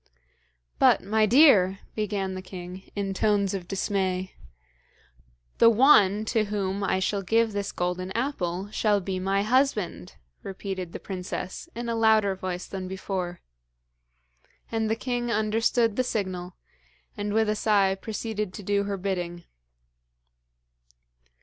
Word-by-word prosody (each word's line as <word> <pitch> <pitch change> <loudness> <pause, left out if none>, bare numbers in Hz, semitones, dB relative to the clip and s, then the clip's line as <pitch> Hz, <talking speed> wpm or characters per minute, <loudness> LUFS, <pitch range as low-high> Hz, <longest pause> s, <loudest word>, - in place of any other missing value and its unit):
'But, - - +5
my 215 +2 +2
dear 210 -7 +6
' - - -32
began 205 -3 -2
the 185 - -5
king, 185 0 -9
in 200 -1 -2
tones 200 0 +1
of 185 -3 -5
dismay. 190 -1 -1 1.3
'The 230 - +8
one 215 -4 +5
to 220 -1 +1
whom 200 -1 -2
I 190 -1 +1
shall 195 +1 0
give 225 +3 +2
this 200 -1 -2
golden 180 +1 -3
apple 200 -7 -2
shall 210 -2 +2
be 190 0 -3
my 195 +2 +1
husband,' 215 - 0 0.3
repeated 190 -2 -5
the - - -7
princess, 185 - -6
in 240 0 -4
a 230 - -1
louder 220 -3 +4
voice 185 -1 -5
than 190 -1 -6
before. 185 -2 -4 1.3
And 225 -1 0
the 220 - +1
king 245 0 -2
understood 225 +1 +1
the 255 - +3
signal, 185 -6 -3 0.6
and 205 0 -3
with 220 +1 +2
a 215 - +1
sigh 205 -3 +3
proceeded 210 -1 -4
to 205 - -8
do 200 +1 +1
her 200 0 -2
bidding. 175 -2 -3
200 Hz, 135 wpm, -26 LUFS, 185-220 Hz, 1.3 s, The